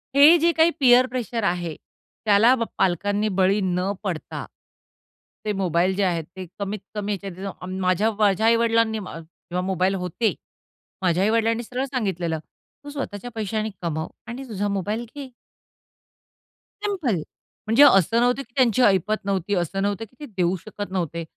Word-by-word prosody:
हे 295 +5 +8
जे 340 +2 +4
काही 325 +1 +5
पियर 250 -2 +6
प्रेशर 240 -3 -3
आहे, 175 -3 -1 0.5
त्याला 215 +4 +6
ब 235 - -1
पालकांनी 205 +4 +1
बळी 195 +2 +3
न 180 +1 0
पडता, 180 -6 -4 1.0
ते 210 - 0
मोबाईल 180 +1 +1
जे 200 - +1
आहेत 175 -3 0
ते 185 -1 -6
कमीत-कमी 205 +1 -4
ह्याच्यात 195 0 -7 0.2
माझ्या 185 +4 +2
माझ्या 210 0 +3
आई-वडिलांनी, 230 -1 +3
जेव्हा 175 -1 -7
मोबाईल 190 +1 +1
होते 215 +5 0 0.7
माझ्या 180 0 +2
आई-वडिलांनी 225 +2 +1
सरळ 250 +3 -3
सांगितलेलं, 190 - -2 0.4
"तू 290 - -8
स्वतःच्या 245 -5 -6
पैशाने 215 0 -2
कमाव 160 -1 -2 0.2
आणि 255 +3 -7
तुझा 205 -1 -2
मोबाईल 205 +4 -2
घे." 275 -3 -7 1.5
सिंपल. 365 - 0 0.5
म्हणजे 225 +6 +6
असं 225 - +5
नव्हतं 245 +3 +2
की 250 - -28
त्यांची 255 -2 +3
ऐपत 205 -1 +2
नव्हती, 200 0 -1
असं 180 +2 -1
नव्हतं 205 +2 -1
की 225 - -27
ते 300 - -7
देऊ 180 0 +2
शकत 205 -2 -7
नव्हते. 170 -3 -2
205 Hz, 145 wpm, -23 LUFS, 185-235 Hz, 1.5 s, हे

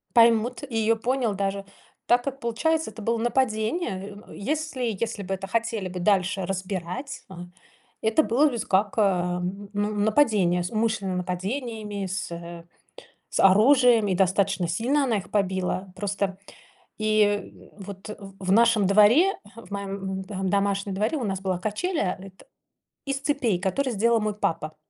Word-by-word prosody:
Поймут, 235 +2 +4
и 235 - -7
её 225 +1 +3
понял 240 -2 -1
даже. 195 0 -2 0.4
Так 245 0 +3
как 275 -1 -4
получается, 300 +4 0
это 220 +1 -10
было 230 +2 0
нападение. 220 - -1
Э, - - -11
если 290 +3 -3 0.2
если 220 -3 -3
бы 195 - -3
это 195 0 -5
хотели 230 -3 -1
бы 180 0 -6
дальше 190 0 +1
разбирать, 190 - -4
а 175 -2 -9 0.6
это 225 +8 +3
было 270 +8 +3
бы 240 - -4
с 220 - -3
как, 200 +2 +2
э, 180 -4 +2 0.3
ну, 205 +1 -1
нападение. 205 -5 +3
С 180 - -4
умышленным 215 -4 0
нападениями, 205 +3 -3
с, 185 -1 -4
э, 170 0 -8 0.6
с - - -3
оружием, 230 +2 +6
и 185 - +1
достаточно 190 -1 +1
сильно 245 - +1
она 235 -6 +1
их 190 - -7
побила. 190 -1 -1
Просто 200 -1 -2 0.6
и, 215 0 +3
э, 205 0 0 0.3
вот, 195 +1 -9
э, - - -5
в 195 -2 -5
нашем 225 -2 +4
дворе, 225 - +5
э, - - -12 0.2
в 210 - -17
моём, 200 -1 -4 0.3
м, - - -9
эм, 190 -2 -2
домашнем 200 0 0
дворе 215 +10 0
у 260 - -3
нас 190 -2 -2
была 185 -2 -1
качеля 215 - -1
эт 190 -1 -13 0.6
из 275 0 -1
цепей, 265 -9 0
которые 245 +8 0
сделал 230 +2 +3
мой 210 -1 -1
папа. 155 -6 -2
205 Hz, 165 wpm, -25 LUFS, 190-235 Hz, 0.6 s, оружием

